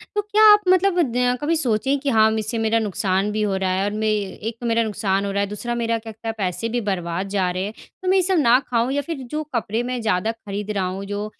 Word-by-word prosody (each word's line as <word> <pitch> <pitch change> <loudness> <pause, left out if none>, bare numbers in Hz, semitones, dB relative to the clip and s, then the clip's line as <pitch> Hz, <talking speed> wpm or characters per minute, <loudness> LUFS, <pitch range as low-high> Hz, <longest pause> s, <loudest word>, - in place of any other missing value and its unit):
तो 415 - +2
क्या 420 +1 +2
आप 415 - +4
मतलब 370 0 +3
द 250 +1 +1
कभी 320 +3 +1
सोचे 265 -1 +1
कि 280 0 -2
हाँ, 220 -2 +4
इससे 215 +2 -3
मेरा 225 0 +2
नुकसान 200 -1 0
भी 215 - -1
हो 200 -2 0
रहा 190 -1 -1
है? 190 +1 0
और 205 - -1
मैं 215 +1 -2
एक 215 +2 -3
मेरा 230 -1 +2
नुकसान 200 -2 -1
हो 200 - -2
रहा 200 - 0
है, 200 - 0
दूसरा 240 +4 -4
मेरा 230 -1 0
क्या 225 0 -9
कहते 220 +1 -10
है 225 - -1
पैसे 195 +3 -2
भी 240 +1 -1
बर्बाद 175 0 -2
जा 190 -2 0
रहे 185 +1 -2
हैं? 210 - -5 0.3
तो 370 - -5
मैं 385 - +4
ये - - +4
सब 370 0 +1
ना 250 -2 +5
खाऊँ 235 +1 +1
या 285 - 0
फिर 315 +1 -5
जो 305 0 -2
कपड़े 225 +1 -1
मैं 250 0 -3
ज़्यादा 215 0 0
खरीद 210 -2 -6
रहा 195 -3 -1
हूँ 190 +2 -4
जो 205 +1 -4
220 Hz, 270 wpm, -22 LUFS, 200-250 Hz, 0.3 s, ना